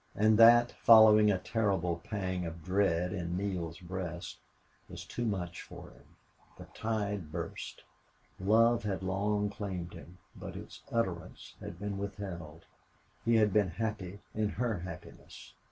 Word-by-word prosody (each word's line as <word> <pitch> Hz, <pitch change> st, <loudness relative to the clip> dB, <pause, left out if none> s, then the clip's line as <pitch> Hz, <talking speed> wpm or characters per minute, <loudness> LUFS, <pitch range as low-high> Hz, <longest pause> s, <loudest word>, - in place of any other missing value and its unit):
And 110 Hz, +1 st, +4 dB
that, 120 Hz, +1 st, +8 dB
following 110 Hz, -2 st, +8 dB
a 100 Hz, -, +3 dB
terrible 90 Hz, -5 st, -1 dB
pang 95 Hz, -3 st, -3 dB
of 80 Hz, -1 st, -8 dB
dread 90 Hz, -1 st, +1 dB
in 90 Hz, -2 st, -3 dB
Neale's 90 Hz, -4 st, -3 dB
breast, 90 Hz, -1 st, -6 dB, 0.5 s
was -, -, -8 dB
too 120 Hz, -, -4 dB
much 90 Hz, -5 st, -3 dB
for -, -, -11 dB
him. -, -, -21 dB, 0.4 s
The -, -, -10 dB
tide 105 Hz, -7 st, -2 dB
burst. 85 Hz, +1 st, -6 dB, 0.6 s
Love 115 Hz, +4 st, +4 dB
had 100 Hz, -3 st, -3 dB
long 105 Hz, +2 st, 0 dB
claimed 95 Hz, -4 st, -5 dB
him, 85 Hz, +1 st, -12 dB, 0.2 s
but -, -, -8 dB
its -, -, -10 dB
utterance 95 Hz, -8 st, -3 dB
had -, -, -8 dB
been 100 Hz, -1 st, -4 dB
withheld. 90 Hz, -6 st, -7 dB, 0.6 s
He 115 Hz, 0 st, +3 dB
had 105 Hz, -3 st, +4 dB
been 105 Hz, -3 st, +3 dB
happy 100 Hz, -1 st, -4 dB
in 105 Hz, -1 st, 0 dB
her 115 Hz, -2 st, -1 dB
happiness. 85 Hz, -2 st, -10 dB
100 Hz, 140 wpm, -32 LUFS, 90-105 Hz, 0.6 s, that